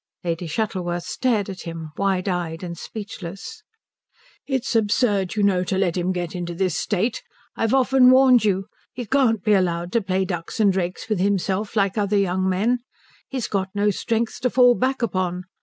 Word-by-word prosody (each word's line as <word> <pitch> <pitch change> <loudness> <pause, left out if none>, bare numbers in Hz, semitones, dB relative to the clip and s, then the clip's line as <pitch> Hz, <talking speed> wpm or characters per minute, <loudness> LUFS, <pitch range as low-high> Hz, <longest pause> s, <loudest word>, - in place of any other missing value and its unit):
Lady 170 0 -2
Shuttleworth 175 -1 -2
stared 235 -6 0
at 190 -2 -7
him, 165 -2 -7
wide 195 -1 0
eyed 175 -2 -2
and 170 -1 -5
speechless. 200 - -8 0.9
"It's 265 -3 -1
absurd, 205 -3 +1
you 210 - +1
know, 190 -3 +3
to 190 - -1
let 185 -3 +1
him 180 0 0
get 175 -2 -3
into 175 -1 -4
this 185 -2 0
state. 210 +6 -1 0.3
I've 225 +3 +1
often 265 -1 +5
warned 255 -2 +6
you. 195 -2 +1 0.3
He 245 -1 -5
can't 225 -4 +2
be 215 - +3
allowed 175 -2 0
to 235 - +2
play 190 -1 0
ducks 175 0 -5
and 205 -3 +4
drakes 180 -1 -3
with 215 -4 -1
himself 200 +2 0
like 200 0 +1
other 205 0 +1
young 190 -1 +1
men. 220 +7 +1 0.5
He's 260 -4 -3
got 195 -1 -1
no 205 +1 +2
strength 225 +3 -2
to 250 +1 +1
fall 245 0 +5
back 260 +1 -1
upon. 185 -4 -1
195 Hz, 180 wpm, -23 LUFS, 180-225 Hz, 0.9 s, warned